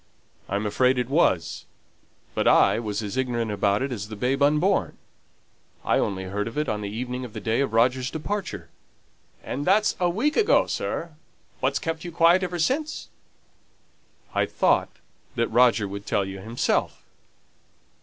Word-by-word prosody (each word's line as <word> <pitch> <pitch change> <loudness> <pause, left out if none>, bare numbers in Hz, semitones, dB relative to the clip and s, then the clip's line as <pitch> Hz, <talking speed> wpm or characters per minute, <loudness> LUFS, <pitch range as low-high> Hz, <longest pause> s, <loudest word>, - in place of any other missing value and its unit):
"I'm 100 +2 -1
afraid 125 +5 +2
it 125 0 -1
was. 90 - +1 0.7
But - - 0
I - - +5
was 105 -1 -3
as 105 +4 -5
ignorant 120 -4 -1
about 100 +2 +1
it 135 - -3
as 105 -4 -4
the 110 - -7
babe 130 +6 -1
unborn. 150 +7 +2 0.9
I - - +2
only 95 -2 -1
heard 100 +3 -3
of 115 - -7
it 150 - 0
on 105 -1 -2
the 100 - -4
evening 125 +4 -4
of 120 -4 -8
the - - -5
day 115 +2 0
of 140 - -1
Roger's 125 +3 +2
departure." 160 - -5 0.7
"And 140 - -4
that's 200 +6 +3
a 180 -1 +2
week 240 - 0
ago, 445 - +4
sir. 170 0 -3 0.5
What's 135 +2 +1
kept 160 +1 -4
you 175 - -6
quiet 170 +2 +4
ever 180 -1 -3
since?" 280 - -1 1.2
"I - - +1
thought - - +2 0.5
that 115 -1 0
Roger 115 -3 +4
would 100 +1 -8
tell 100 - +1
you 95 0 -7
himself." 115 +5 -1
125 Hz, 165 wpm, -25 LUFS, 105-160 Hz, 1.2 s, I